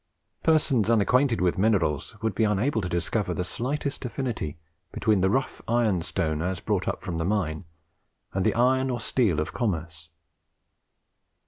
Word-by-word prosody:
Persons 145 -9 +2
unacquainted 115 +2 +3
with 90 +1 +1
minerals 95 -8 +1
would 110 -2 +1
be 110 - +1
unable 110 +4 +1
to 90 - -3
discover 90 +2 -1
the 90 - -1
slightest 140 +10 -3
affinity 120 - -3 0.3
between 105 -4 +1
the 95 - +3
rough 135 +6 -1
ironstone 90 -8 0
as 90 +1 -2
brought - - -1
up - - -2
from 85 -2 -3
the - - 0
mine, 85 -4 -1 0.7
and 95 - 0
the - - +2
iron 130 +2 +3
or 125 -1 -1
steel 110 - +1
of 75 - -3
commerce. 85 -8 -3
105 Hz, 150 wpm, -26 LUFS, 85-120 Hz, 0.7 s, unacquainted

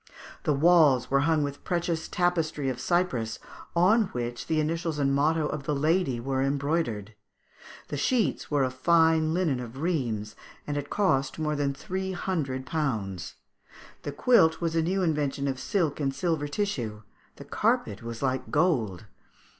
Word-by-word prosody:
The 150 - +3
walls 145 -5 +4
were 140 - +4
hung 155 -2 +3
with 140 0 -5
precious 170 -2 -1
tapestry 165 -6 0
of 125 -1 -4
Cyprus, 130 -10 0 0.4
on 210 +6 +4
which 120 0 -4
the 160 -1 +1
initials 165 +1 -1
and 135 -1 +1
motto 155 +3 +2
of 150 -2 -4
the 150 - 0
lady 155 -3 +1
were 130 +2 -1
embroidered; 135 -6 -1 0.8
the 145 - -3
sheets 230 - 0
were 145 -2 +2
of 130 -1 -1
fine 160 +3 +3
linen 165 -8 +1
of 125 +1 -8
Rheims, 120 -10 -2 0.3
and 145 - -3
had 145 0 -4
cost 140 -10 +1
more 150 -1 -1
than 140 -1 -1
three 190 +4 -4
hundred 150 -8 -2
pounds; 110 - -3 0.7
the 145 - -4
quilt 160 - +4
was 165 -1 -1
a 165 - +3
new 185 +4 0
invention 145 -4 0
of 130 -2 -2
silk 155 +2 0
and 135 -2 -1
silver 160 -4 -1
tissue; 125 - -3 0.3
the - - -11
carpet 100 - 0
was 115 +2 -6
like 130 -1 -1
gold. 125 - +1
145 Hz, 160 wpm, -27 LUFS, 130-165 Hz, 0.8 s, walls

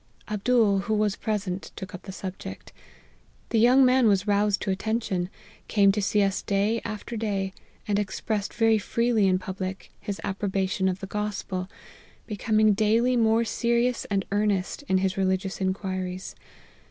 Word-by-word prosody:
Abdool, 210 -1 +2
who 215 +2 -1
was 210 -1 +1
present, 200 -4 -3
took 190 +1 -8
up 185 - -7
the 195 - -8
subject. 190 0 -8 0.8
The 230 - +2
young 255 +4 +6
man 255 -1 +4
was 200 -2 +3
roused 205 -1 +2
to 195 - 0
attention, 195 -3 -1 0.4
came 200 -2 +4
to 210 +1 -1
see 205 +1 +2
us 195 -1 0
day 205 +3 0
after 220 +1 -5
day, 200 -3 -2 0.3
and 205 -1 +1
expressed 210 0 -2
very 225 -1 +3
freely 230 0 +1
in 185 -1 +3
public 190 0 -6
his 200 -1 -5
approbation 190 -1 0
of 185 +2 -4
the - - -4
Gospel, 200 -2 -3 0.6
becoming 215 0 +2
daily 225 +4 +2
more 225 0 +3
serious 235 +1 +1
and 195 -2 -1
earnest 205 +1 0
in 190 - +3
his 190 0 0
religious 190 0 -1
inquiries. 185 -1 -3
205 Hz, 155 wpm, -26 LUFS, 190-220 Hz, 0.8 s, young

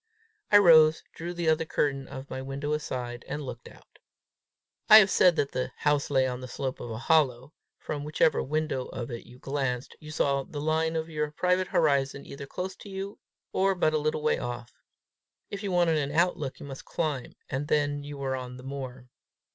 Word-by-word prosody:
I 205 - +9
rose, 160 -5 +7
drew 170 +1 -5
the 175 -1 -3
other 160 0 +3
curtain 140 -4 -1
of 130 +1 -8
my 130 - -5
window 140 +2 -3
aside, 125 -5 -4
and 150 - -4
looked 125 -2 -8
out. - - -18 0.9
I 215 - +12
have 200 -3 +7
said 180 -2 +5
that 140 - 0
the 130 - -3
house 145 -1 +1
lay 135 -2 +3
on 125 -1 -3
the 130 - -6
slope 130 +1 -4
of 120 - -6
a 110 - -4
hollow: 135 -1 +2 0.2
from 145 -2 -5
whichever 150 0 +2
window 155 -3 -1
of 120 0 -6
it 115 - -7
you 125 - -14
glanced, 135 -2 -3
you 150 - -11
saw 140 -3 +1
the 145 +2 -7
line 160 +2 0
of 160 0 -1
your 150 -1 -1
private 180 +4 +1
horizon 140 -5 +1
either 140 0 -8
close 185 +5 -5
to 205 - -11
you, 195 +1 -6 0.3
or 195 0 +2
but 155 -3 +2
a 155 - +2
little 155 0 -1
way 155 - +2
off. 120 -1 -5 0.8
If 200 - -5
you 200 -2 -3
wanted 175 -3 +3
an 140 -1 -2
outlook, 160 -3 0
you - - -8
must 135 -2 -8
climb; 150 -6 -3
and 135 +3 -3
then 145 -1 +1
you 145 0 -7
were 135 -1 -2
on 125 -1 -6
the 125 - -11
moor. 130 -2 -7
145 Hz, 205 wpm, -28 LUFS, 130-160 Hz, 0.9 s, I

